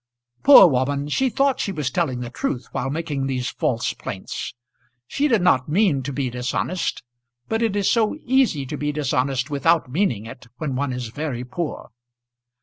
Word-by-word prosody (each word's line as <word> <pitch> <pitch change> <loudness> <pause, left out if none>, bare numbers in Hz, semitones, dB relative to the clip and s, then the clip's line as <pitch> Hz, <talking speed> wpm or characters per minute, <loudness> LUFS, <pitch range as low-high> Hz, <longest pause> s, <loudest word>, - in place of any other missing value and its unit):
Poor 275 -8 +10
woman! 140 -1 +1
she 265 - +1
thought 275 +3 +1
she 200 - -1
was 150 -8 -2
telling 135 -8 -1
the 120 -1 -6
truth 125 -1 -3
while 130 - -2
making 145 -3 -2
these 125 -2 -2
false 115 -2 -1
plaints. 95 +5 -6 0.5
She 285 - 0
did 230 -9 +2
not 130 -6 +3
mean 170 -5 +2
to 135 +2 -4
be 135 -2 -2
dishonest, 125 +8 -2 0.4
but 225 +1 -1
it 225 -3 +1
is 200 -2 +1
so 225 +1 +2
easy 250 - +2
to 145 +3 -5
be 150 +1 -1
dishonest 135 -2 -1
without 155 -1 +2
meaning 130 - 0
it 115 +2 -11
when 140 -3 -3
one 140 0 -1
is 125 -2 -4
very 130 -1 -4
poor! 155 +5 -5
145 Hz, 175 wpm, -22 LUFS, 125-180 Hz, 0.5 s, Poor